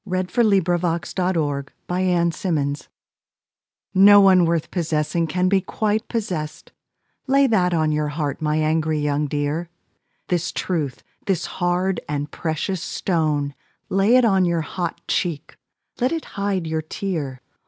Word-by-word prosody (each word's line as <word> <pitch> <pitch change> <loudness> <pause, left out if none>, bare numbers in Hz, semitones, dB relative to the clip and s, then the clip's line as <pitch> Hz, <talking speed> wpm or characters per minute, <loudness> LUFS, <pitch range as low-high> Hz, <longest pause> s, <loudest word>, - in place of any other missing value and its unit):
com 195 -4 -7
Advice 185 -1 -4 0.8
To 180 -1 0
A 190 - +1
Girl 145 -4 -1 0.2
By 180 +1 -1
Sara 170 -1 +2
Teasdale 150 -4 -2 1.1
No 205 +1 +8
one 190 -3 +6
worth 165 -1 -1
possessing 165 -1 0
Can 180 +3 0
be 195 0 +3
quite 215 +3 -1
possessed; 180 -10 -4 0.6
Lay 275 +1 +4
that 190 -8 +2
on 155 -1 +2
your 150 0 0
heart, 145 -1 -3
My 150 0 0
young 155 - +1
angry 150 -2 0
dear; 145 +4 -2 0.6
This 175 -1 -1
truth, 155 -8 -3 0.2
this 185 -4 0
hard 180 +1 0
and 145 0 -3
precious 165 +2 -2
stone, 150 -5 -1 0.4
Lay 195 +5 +3
it 255 -1 +5
on 195 -4 +3
your 170 -2 +1
hot 170 +2 -4
cheek, 170 -5 -2 0.4
Let 250 +2 +1
it 330 -1 -3
hide 200 -3 -1
your 160 0 -1
tear. 155 -6 -4
170 Hz, 145 wpm, -22 LUFS, 150-190 Hz, 1.1 s, No